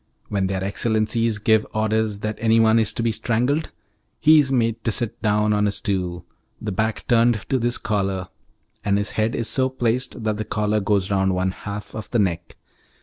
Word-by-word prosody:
When 100 -2 0
their 95 0 -2
excellencies 110 +2 0
give 110 +1 +3
orders 110 -1 0
that 105 0 -3
anyone 115 0 +4
is 110 -2 0
to 115 - -3
be 115 - +2
strangled, 125 +8 0 0.5
he 155 0 +6
is 140 -2 +1
made 115 -3 0
to 115 - 0
sit 115 +1 -2
down 105 -1 +2
on 105 0 +2
a - - +1
stool, 90 -4 -3 0.3
the 105 - -4
back 110 +3 -2
turned 115 -2 +3
to 130 - +1
this 120 +1 +1
collar, 95 -5 -2 0.5
and 100 -1 +2
his 105 0 -2
head 110 +1 0
is 115 - -1
so 130 +2 +2
placed 125 -2 -2
that 110 -1 -1
the 110 - -2
collar 105 0 0
goes 100 -1 0
round 95 -1 +2
one 95 +1 0
half 100 +2 -7
of 110 - -7
the 120 - 0
neck. 90 -5 -1
110 Hz, 195 wpm, -22 LUFS, 100-115 Hz, 0.5 s, he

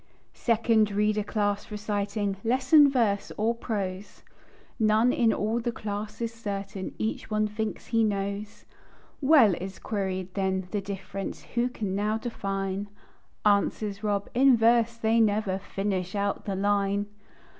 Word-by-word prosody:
"Second 225 -2 +2
Reader 210 +1 +1
Class" 205 -1 -1
reciting 205 -1 -2
"Lesson 265 +5 +5
verse 225 -7 +1
or 225 +2 +2
prose?" 200 -4 -5 0.6
None 220 +3 +4
in 230 -3 +3
all 220 +3 0
the 240 0 -2
class 210 -1 -5
is 230 -1 -2
certain; 200 -3 -5
Each 220 0 -3
one 215 0 +1
thinks 215 +1 -4
he 230 -1 +2
knows. 200 0 -3 0.6
"Well," 270 - +6
is 190 +3 -5
queried 190 -3 -3
then, 190 -1 -1
"the 205 - -1
difference 195 0 -6
Who 245 +1 +1
can 210 -6 -4
now 210 +2 0
define?" 195 -3 -3 0.6
Answers 205 0 +1
Rob: 200 -1 0
"In 260 0 +5
verse 230 0 +3
they 225 0 +2
never 205 -3 +1
Finish 195 -1 -3
out 200 0 -1
the 200 - -2
line!" 200 0 +1
210 Hz, 135 wpm, -27 LUFS, 200-225 Hz, 0.6 s, Well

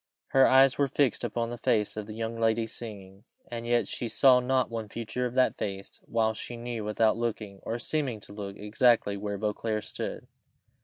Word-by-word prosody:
Her 135 0 +6
eyes 135 0 +5
were 140 - +4
fixed 135 -3 +1
upon 115 0 -2
the 120 - -6
face 105 -2 +1
of 105 -1 -5
the 110 - -7
young 115 0 -4
lady 115 0 +2
singing, 100 -4 -9 0.3
and 120 0 -5
yet 120 0 +2
she 120 - -3
saw 130 +2 +5
not 125 -1 +1
one 115 -2 -4
feature 115 +3 -3
of 125 - -9
that 130 -1 +4
face, 95 -1 -5
while 110 -1 +1
she 120 +2 -6
knew, 120 -2 -4
without 110 +1 +2
looking, 110 -4 -3
or 115 - -3
seeming 130 -3 -1
to 100 - -11
look, 100 -1 -6
exactly 110 -1 +2
where 100 0 -4
Beauclerc 105 +1 -2
stood. - - -5
115 Hz, 195 wpm, -28 LUFS, 105-120 Hz, 0.3 s, Her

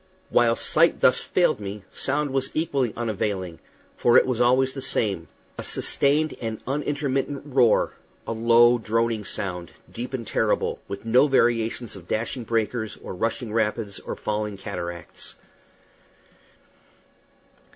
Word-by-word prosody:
While 115 -1 +4
sight 165 +7 +3
thus 125 - +5
failed 175 - +1
me, 100 0 -6
sound 145 +1 -1
was 135 0 0
equally 140 -7 0
unavailing, 100 -6 -2 0.4
for 120 - +4
it - - +6
was 125 -2 -1
always 130 +2 +3
the 135 - -6
same 100 -9 0 0.3
a - - -3
sustained 150 +3 +1
and 110 -2 -3
unintermittent 140 0 -2
roar, 130 -5 +3 0.3
a - - -4
low, 120 +1 +5
droning 115 0 0
sound, 90 -4 -4 0.2
deep 125 +3 -5
and 120 -3 -5
terrible, - - 0
with 100 +2 -7
no 125 +6 +5
variations 120 -4 +1
of 90 -3 -12
dashing 115 +2 -2
breakers 110 0 -1
or - - -6
rushing 115 +3 -2
rapids 105 -2 -1
or - - -6
falling 105 -1 -3
cataracts. 90 -4 -6
115 Hz, 130 wpm, -25 LUFS, 105-130 Hz, 0.4 s, it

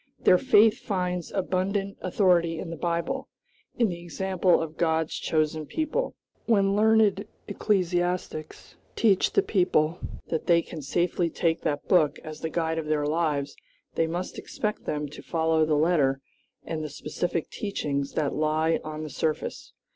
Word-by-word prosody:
Their 180 - +5
faith 220 -4 +5
finds 180 -3 -2
abundant 195 +1 -1
authority 175 -3 +2
in 165 0 -5
the - - -4
Bible, 170 +1 -2 0.5
in 235 - +3
the 170 -1 -5
example 185 +1 +1
of 160 -1 -4
God's 160 -1 0
chosen 155 -1 -1
people. 320 +11 -2 0.3
When 200 -3 +3
learned 215 -2 +3 0.2
ecclesiastics 180 -5 -1 0.2
teach 200 -5 +3
the 400 - +4
people 180 - +1 0.3
that 160 - -2
they 170 -1 +4
can 160 - -8
safely 170 +4 0
take 165 0 0
that 145 0 -2
book 155 -6 +3
as 155 -1 -8
the 160 - -2
guide 160 -1 -1
of 155 - -5
their 150 -1 +1
lives, 150 -2 0 0.4
they 165 - +1
must 175 +3 -4
expect 210 0 -4
them 150 0 -2
to 145 - -11
follow 160 -1 +1
the 155 -1 +2
letter 145 -4 +2 0.5
and 160 -1 -3
the 155 - -4
specific 165 +3 -3
teachings 140 -9 -3
that 145 -3 0
lie 155 +2 +1
on 155 0 -5
the 155 - -5
surface. 155 -1 -3
170 Hz, 155 wpm, -26 LUFS, 155-185 Hz, 0.5 s, Their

